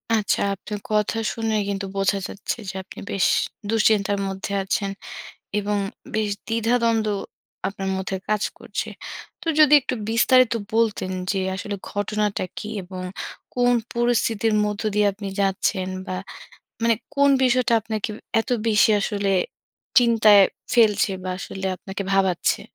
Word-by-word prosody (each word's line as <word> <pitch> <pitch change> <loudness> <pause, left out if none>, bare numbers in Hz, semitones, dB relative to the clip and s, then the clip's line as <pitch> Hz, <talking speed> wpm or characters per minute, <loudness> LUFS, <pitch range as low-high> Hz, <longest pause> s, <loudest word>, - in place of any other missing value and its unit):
আচ্ছা, 210 -2 +1
আপনার 205 +2 -6
কথা 210 +1 +1 0.2
শুনে 225 -1 -1
কিন্তু 200 0 -2
বোঝা 195 0 +2
যাচ্ছে 205 - -4
যে, - - -5
আপনি - - -12
বেশ 195 -2 +2 0.4
দুশ্চিন্তার 210 -2 +2
মধ্যে 195 +1 -5
আছেন 195 +1 -1 0.7
এবং 205 0 -1 0.4
বেশ 215 -1 +1 0.2
দ্বিধাদ্বন্দ্ব 230 -1 +1 0.6
আপনার 195 -1 -4
মধ্যে 190 0 -3
কাজ 215 -1 +1 0.2
করছে। - - -4 0.5
তো 355 - -8
যদি 300 -1 +7
একটু 260 - -3
বিস্তারিত 245 +2 +4 0.2
বলতেন 220 -4 +1 0.2
যে, 195 - 0 0.2
আসলে 205 +1 -4 0.2
ঘটনাটা 210 0 -1
কি 210 - -5 0.2
এবং 185 0 -7 0.5
কোন 245 0 +4 0.2
পরিস্থিতির 230 -2 +1
মধ্য 210 -1 -3
দিয়ে 210 0 +4
আপনি 200 0 -7
যাচ্ছেন 190 -1 0 0.2
বা 185 - -3 0.7
মানে 230 0 +4 0.2
কোন 280 0 +5
বিষয়টা 255 -1 +3
আপনাকে 220 0 -3 0.3
এত 225 - -6 0.2
বেশি 215 0 +5
আসলে 200 -1 -1 0.7
চিন্তায় 225 -4 +6 0.3
ফেলছে 215 -3 +4
বা 185 - -3
আসলে 190 0 -5
আপনাকে 195 +2 -6
ভাবাচ্ছে? 190 -3 +2
210 Hz, 130 wpm, -23 LUFS, 195-230 Hz, 0.7 s, যদি